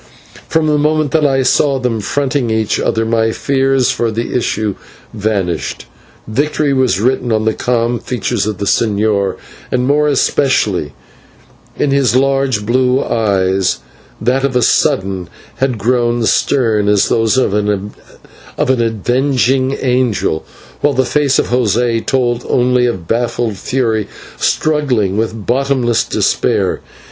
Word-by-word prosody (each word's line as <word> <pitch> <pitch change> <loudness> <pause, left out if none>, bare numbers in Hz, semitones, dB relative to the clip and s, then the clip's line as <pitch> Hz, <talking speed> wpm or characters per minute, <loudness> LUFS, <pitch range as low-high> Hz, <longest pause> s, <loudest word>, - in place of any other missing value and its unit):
From 160 -1 +1
the 150 -1 +2
moment 155 -1 +1
that 155 -2 +3
I 135 -1 +1
saw 140 +2 +2
them 125 -3 -1
fronting 135 +1 -1
each 110 -1 0
other, 115 0 0
my 115 0 +1
fears 135 0 +1
for 120 - -1
the 115 +2 -3
issue 110 -4 -1 0.4
vanished. 100 -6 -2 0.4
Victory 145 +4 0
was 130 -7 +1
written 125 +1 0
in 110 0 +1
the 110 - +2
calm 120 0 -1
features 120 -4 -2
of 105 -3 -3
the 100 - -3
señor, 105 -2 +1 0.4
and 125 0 +1
more 150 +2 +2
especially 110 - +1 0.8
in 145 - 0
his 135 -3 +2
large 135 -4 +1
blue 125 +3 +2
eyes, 95 -4 0 0.4
that 125 +4 0
of 135 -2 -1
a 125 - +3
sudden 95 -4 +1 0.3
had 130 -1 0
grown 120 +1 +1
stern 110 -5 +1
as 105 -1 +3
those 115 +2 +1
of 130 -6 +1
an 105 -1 -1 0.7
avenging 130 +3 +1
angel, 120 -10 0 0.4
while 145 0 +1
the 130 +1 +2
face 140 0 +1
of - - 0
José 120 -1 +1
told 120 -2 0
only 125 0 +2
of 95 -9 -4
baffled 115 -1 -1
fury 110 -1 -1 0.3
struggling 130 -11 +1
with 110 -1 -3
bottomless 130 -2 +1
despair. - - 0
120 Hz, 135 wpm, -15 LUFS, 110-130 Hz, 0.8 s, that